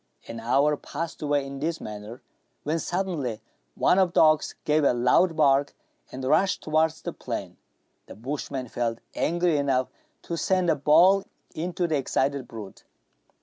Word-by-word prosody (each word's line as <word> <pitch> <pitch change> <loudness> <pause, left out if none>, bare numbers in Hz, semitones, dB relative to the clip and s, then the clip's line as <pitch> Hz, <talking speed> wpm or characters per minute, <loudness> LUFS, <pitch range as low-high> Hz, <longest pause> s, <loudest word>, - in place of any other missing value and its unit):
An 115 - -7
hour 135 +6 +2
passed 165 +4 -6
away 145 -2 0
in 135 0 -7
this 160 +3 -2
manner, 105 +3 -8 0.4
when 160 +3 -1
suddenly 165 - -2 0.4
one 185 - +3
of 190 -2 +4
the - - +3
dogs 155 -1 +4
gave 150 0 +2
a 140 - +4
loud 155 +8 +3
bark, 140 -2 +3 0.4
and 130 +1 -7
rushed 185 +8 +2
towards 155 +1 +1
the - - -4
plain. - - -6 0.5
The - - -10
bush 135 +8 -5
man 130 -2 -4
felt 115 0 -2 0.2
angry 170 -1 +1
enough 135 -3 +1 0.3
to 170 - -4
send 185 -1 +2
a - - +2
ball 175 +8 +5 0.3
into 175 +2 -2
the 160 -3 0
excited 135 -1 -1
brute. 110 -4 -10
150 Hz, 160 wpm, -26 LUFS, 130-165 Hz, 0.5 s, ball